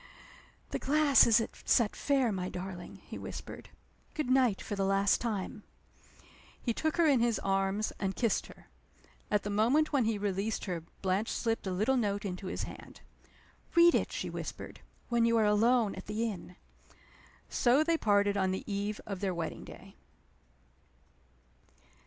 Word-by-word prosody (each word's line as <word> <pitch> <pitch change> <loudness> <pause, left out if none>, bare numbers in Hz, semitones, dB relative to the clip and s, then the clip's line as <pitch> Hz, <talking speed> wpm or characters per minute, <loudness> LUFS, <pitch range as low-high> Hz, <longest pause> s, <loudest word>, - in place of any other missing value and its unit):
"The - - -2
glass 295 0 +5
is 230 0 +6
at 225 - -3
Set 230 -3 +2
Fair, 270 -5 +1
my 185 -2 -3
darling," 180 -1 -7
he - - -8
whispered. - - -8 0.5
"Good 300 -5 -1
night 255 -6 +3
for 205 - -5
the 195 - -1
last 195 0 +2
time!" 210 -3 -3 1.0
He 235 - -1
took 315 +7 -1
her 340 - +4
in 280 -5 +4
his 235 -1 +2
arms, 195 +2 0
and 195 -1 -2
kissed 230 -4 0
her. - - -15 0.6
At 210 -1 +1
the 205 - -3
moment 250 +10 +2
when 265 -5 +3
he 220 -1 0
released 205 +2 -2
her 180 -4 -3 0.2
Blanche 190 +4 0
slipped 225 -3 -1
a - - -1
little 215 +9 +1
note 205 -3 -1
into 185 0 -5
his - - -3
hand. - - -10 0.7
"Read 340 0 +7
it," - - +1
she - - -3
whispered, - - -7 0.3
"when 235 -1 +2
you 230 0 +3
are 220 - +3
alone 220 +1 +3
at - - -9
the 220 +3 -1
inn." 180 -4 -7 0.9
So 255 +5 +3
they 335 +1 +2
parted 205 -7 +2
on 190 -1 +1
the 190 - -3
eve 205 +1 -3
of 195 -3 -5
their 190 -2 -1
wedding 165 -1 -4
day. - - -13
210 Hz, 165 wpm, -31 LUFS, 195-240 Hz, 1.0 s, Read